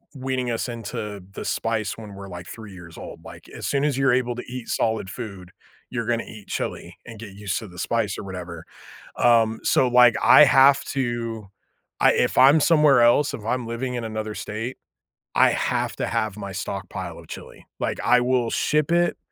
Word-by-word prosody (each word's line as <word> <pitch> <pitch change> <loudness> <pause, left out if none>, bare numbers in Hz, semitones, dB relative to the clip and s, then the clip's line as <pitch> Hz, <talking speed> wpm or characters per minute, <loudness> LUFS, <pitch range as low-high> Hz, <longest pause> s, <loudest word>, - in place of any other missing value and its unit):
weaning 130 -2 -2
us 115 - -2
into 105 -3 -6
the - - -7
spice 110 -3 -1
when 105 -3 -10
we're, 100 0 -9
like, 90 0 -9
3 110 -3 -10
years 85 -2 -12
old, - - -10
like, - - -12
as - - -6
soon 140 0 0
as 150 -3 +1
you're 135 -2 +3
able 125 -1 +1
to 125 - -6
eat 125 -1 -7
solid 110 -3 0
food, 100 -6 -8 0.4
you're 115 -3 -3
gonna 120 -1 0
eat 105 -3 -12
chili - - -5
and 115 -3 -11
get 105 -3 -9
used 105 -1 -3
to 110 - -9
the 90 -2 -14
spice 110 -3 -1
or - - -6
whatever. 90 -3 -8 0.5
Um, 115 -2 +3
so, 130 - +3
like, 125 -2 +6
I 150 - +8
have 135 0 +5
to 120 -5 -3 0.5
I - - +5
if - - 0
I'm 140 +4 +7
somewhere 150 -5 +5
else, 120 +5 +4
if 105 - -11
I'm 120 +1 -1
living 125 +2 -3
in 120 - -3
another 110 -1 -4
state, 115 +5 -5 0.6
I - - +6
have - - -1
to - - -2
have 110 -2 -2
my 100 -1 -6
stockpile 95 -1 -5
of - - -17
chili. - - -10 0.2
Like, - - -2
I 125 - +5
will 125 -2 +1
ship 150 +1 +1
it. 175 0 +2
115 Hz, 195 wpm, -23 LUFS, 105-125 Hz, 0.6 s, I